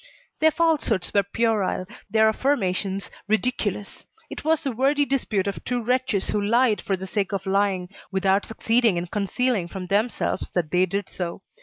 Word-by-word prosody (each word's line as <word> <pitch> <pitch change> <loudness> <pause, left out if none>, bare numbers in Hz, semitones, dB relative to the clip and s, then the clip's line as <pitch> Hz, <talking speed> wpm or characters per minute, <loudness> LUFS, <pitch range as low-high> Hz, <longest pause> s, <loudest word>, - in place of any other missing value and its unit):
Their 315 - +6
falsehoods 310 - +1
were 200 - +5
puerile, 205 -2 0 0.2
their 220 +1 +4
affirmations 200 -5 0 0.2
ridiculous. 210 -2 -1 0.3
It - - -6
was 320 +1 +2
the 275 - -1
wordy 275 +5 +2
dispute 235 -8 0
of 200 -1 -4
two 245 0 -1
wretches 250 -4 0
who 210 - 0
lied 230 +1 +3
for 195 - -1
the 190 - -6
sake 195 0 -2
of 195 -1 -3
lying, 195 -2 +1 0.2
without 195 +1 +2
succeeding 225 -2 +2
in 170 - -1
concealing 205 +1 0
from 185 +1 -6
themselves 205 +2 0
that 170 -4 0
they 185 +1 +3
did 200 +2 -2
so. 180 +1 -5
205 Hz, 165 wpm, -24 LUFS, 190-245 Hz, 0.3 s, Their